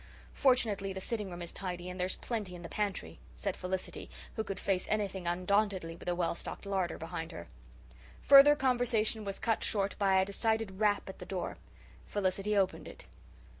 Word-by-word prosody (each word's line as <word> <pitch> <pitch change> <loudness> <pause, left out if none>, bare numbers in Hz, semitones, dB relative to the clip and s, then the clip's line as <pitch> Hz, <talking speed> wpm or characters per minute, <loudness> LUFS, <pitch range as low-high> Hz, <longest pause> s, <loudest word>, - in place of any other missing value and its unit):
"Fortunately 220 -8 +2
the 190 - -5
sitting 210 0 -3
room 175 -1 -6
is 170 - -3
tidy 180 -2 -4
and 180 0 -6
there's 180 +1 0
plenty 210 -6 -4
in 175 - -9
the 170 - -7
pantry," 205 -2 -3 0.2
said 195 -2 -2
Felicity, 185 0 -4 0.3
who 220 - -1
could 195 -2 -5
face 190 -2 0
anything 195 -4 -1
undauntedly 185 -1 +1
with 175 - -6
a 175 - +1
well 175 -1 0
stocked 170 - -7
larder 190 -3 -1
behind 165 0 -5
her. 85 - -8 0.8
Further 280 +1 +9
conversation 245 -5 +1
was 195 -1 -4
cut 225 -2 0
short 200 -2 +1
by 195 -2 +4
a 190 - +3
decided 220 -1 -1
rap 210 -1 +2
at 190 - -8
the - - -7
door. 185 -2 -3 0.5
Felicity 200 +1 0
opened 190 -1 +1
it. - - -10
195 Hz, 180 wpm, -32 LUFS, 180-215 Hz, 0.8 s, Further